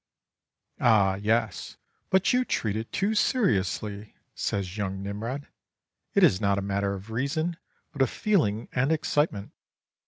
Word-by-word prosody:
"Ah 100 -5 +4
yes! 110 -1 -1 0.3
but 190 +4 +3
you 250 0 +3
treat 110 - -1
it 110 +1 -4
too 200 +3 0
seriously," 105 - 0 0.2
says 95 -2 -2
young 95 -2 -3
Nimrod. 115 +8 -4 0.7
"It - - +5
is 95 - +5
not 100 -1 +2
a - - 0
matter 100 0 -1
of 100 +3 -9
reason, 155 +8 -1 0.4
but 140 - -3
of 130 - +4
feeling 145 - +1
and 135 +4 +1
excitement. 150 -9 0
110 Hz, 135 wpm, -27 LUFS, 100-145 Hz, 0.7 s, It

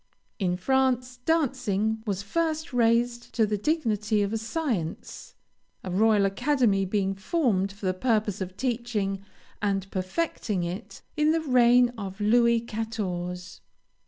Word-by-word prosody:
In 180 -3 0
France, 255 +3 +1
dancing 235 -9 +1
was 200 -1 -2
first 315 +5 -2
raised 240 0 +1
to 225 - +4
the 210 0 -1
dignity 215 -5 0
of 200 +2 -2
a - - +1
science, 225 - -4 0.5
a 185 - -5
royal 210 +1 +4
academy 215 -2 +2
being 195 0 0
founded 195 - 0
for 205 - -7
the 185 - +2
purpose 210 -1 0
of 185 0 -5
teaching 225 -6 -2 0.4
and 195 -2 -1
perfecting 190 - -2
it, 180 +6 -6
in 305 0 +3
the 325 - +1
reign 250 -3 +5
of 195 0 -6
Louis 235 +2 +4
Quatorze. 190 -6 -4
220 Hz, 130 wpm, -27 LUFS, 195-245 Hz, 0.5 s, reign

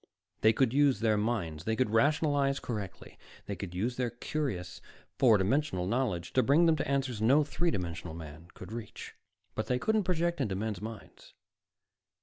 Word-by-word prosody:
They 110 - +5
could 120 +1 +1
use 140 -5 +4
their 110 -1 +3
minds; 100 -8 -2
they 110 - 0
could 125 -2 0
rationalize 140 +2 +2
correctly; 105 -6 -6 0.3
they 100 - -4
could 90 -3 -7
use 120 +7 -1
their 125 -2 0
curious 120 -8 -4 0.4
four 115 -5 +6
dimensional 100 -1 0
knowledge 105 -5 -1
to 130 - +4
bring 145 +6 +4
them 165 -1 +4
to - - -2
answers 135 -5 -1
no 135 +7 +5
three 170 +4 -1
dimensional 90 - -4
man 80 0 -10
could - - -10
reach. 115 -1 -7 0.4
_But - - -2
they 125 - +1
couldn't 215 +8 +1
project 170 -2 0
into 105 -7 -1
men's 105 -1 -3
minds! 110 0 -10
115 Hz, 170 wpm, -30 LUFS, 100-140 Hz, 0.4 s, four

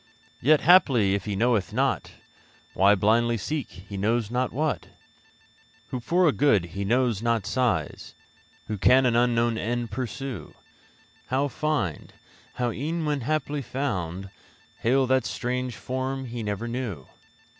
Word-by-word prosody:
Yet, 150 +3 +4
haply 135 - +5
if 100 - -2
he 105 -2 -2
knoweth 115 -3 +1
not, - - 0 0.6
Why 100 +3 +5
blindly 115 +4 +2
seek 145 +7 -3
he 95 +3 -10
knows 110 +2 0
not 125 +1 0
what?[Q] 150 +3 -2 1.0
Who 130 - -3
for 175 +8 +2
a - - +5
good 110 -7 +3
he 100 +1 -3
knows 120 0 +1
not 115 -3 0
sighs? 105 - -1 0.5
Who 105 -2 -4
can 130 +5 +5
an 120 -2 +2
unknown 120 -1 +2
end 120 0 -2
pursue? 130 +2 -5 0.7
How 135 +3 0
find? 145 - -2 0.4
How 125 -1 -1
e'en 160 +6 -3
when 145 -2 -1
haply 150 +2 -1
found 95 -9 -3 0.5
Hail 130 +3 +2
that 130 0 +2
strange 125 0 -3
form 130 +1 -3
he 120 -1 -5
never 105 +1 -3
knew? 115 - -4
120 Hz, 140 wpm, -26 LUFS, 105-135 Hz, 1.0 s, haply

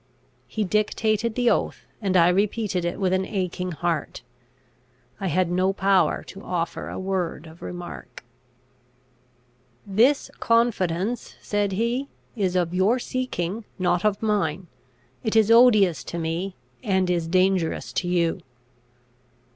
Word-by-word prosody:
He 220 - -2
dictated 215 +2 0
the 245 -1 +3
oath, - - -1 0.2
and 190 -3 +2
I 170 0 +6
repeated 195 -1 0
it 175 - -3
with 185 -2 +1
an 190 0 +2
aching 185 -2 -3
heart. 165 -5 -3 1.0
I 195 - -2
had 180 +1 +1
no 185 +2 +2
power 195 -1 +2
to 195 - -11
offer 170 -4 -3
a - - -6
word 185 -4 -2
of 160 +1 -14
remark. 175 -1 -8 1.6
"This 235 +9 +2
confidence," 230 -2 0
said 205 -1 -1
he, 235 +7 -1 0.3
"is 190 -5 0
of 175 -1 +1
your 195 +7 +3
seeking, 230 -6 -3
not 175 -2 +1
of 210 0 +1
mine. 190 -5 0 0.6
It 220 -2 -1
is 220 0 +5
odious 210 - +5
to 170 - -5
me, 170 +3 -3 0.3
and 190 -4 +1
is 170 -2 0
dangerous 185 -1 +1
to 180 - -1
you." 175 0 +1
190 Hz, 130 wpm, -24 LUFS, 175-215 Hz, 1.6 s, I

